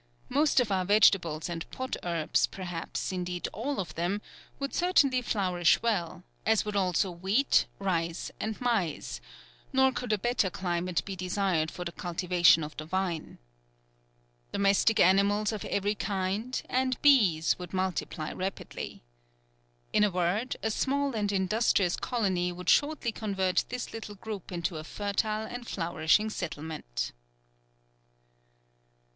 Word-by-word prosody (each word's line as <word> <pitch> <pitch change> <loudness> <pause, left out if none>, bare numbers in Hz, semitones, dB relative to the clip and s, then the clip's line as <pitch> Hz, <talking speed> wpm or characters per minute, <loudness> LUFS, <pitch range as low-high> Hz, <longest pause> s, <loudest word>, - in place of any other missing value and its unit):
Most 290 +2 +3
of 235 -5 +1
our 190 -1 +2
vegetables 180 -6 +4
and 170 -1 -5
pot 260 0 -4
herbs, 170 -3 +1
perhaps, 175 0 -4
indeed, 180 -1 -3
all 275 +5 -3
of 185 - -4
them 175 +5 -1 0.4
would 275 0 -4
certainly 290 -8 +3
flourish 180 -7 +2
well, 180 -7 -1 0.2
as 220 -1 +2
would 210 -1 -3
also 185 -1 +1
wheat, 195 +10 +2
rice, 170 -3 -2
and 220 0 -3
maize, 230 -10 -1 0.5
nor 265 -1 +4
could 250 -2 -4
a 215 - +3
better 240 -2 +1
climate 180 -1 -2
be 195 - -5
desired 180 -3 0
for 180 +2 -7
the 170 - -3
cultivation 175 -2 +3
of 150 +1 -7
the 155 - -5
vine. 175 -2 -2 1.1
Domestic 200 +2 +3
animals 200 +3 +4
of 215 -3 -4
every 200 +1 0
kind 205 +4 -2
and 255 0 0
bees 195 - +5
would 180 -2 -7
multiply 185 -4 -2
rapidly. 190 - -5 0.9
In 210 - +4
a 210 - +4
word, 185 +6 0
a 220 - +1
small 280 +4 0
and 205 -2 0
industrious 195 -1 +2
colony 190 -8 0
would 180 0 0
shortly 290 -5 +2
convert 195 -4 0
this 250 0 -5
little 215 -2 -7
group 200 -2 -7
into 170 -1 -2
a 155 - -6
fertile 215 +4 -2
and 240 +1 -7
flourishing 170 +4 +1
settlement." 150 - -4
195 Hz, 135 wpm, -29 LUFS, 175-220 Hz, 1.1 s, bees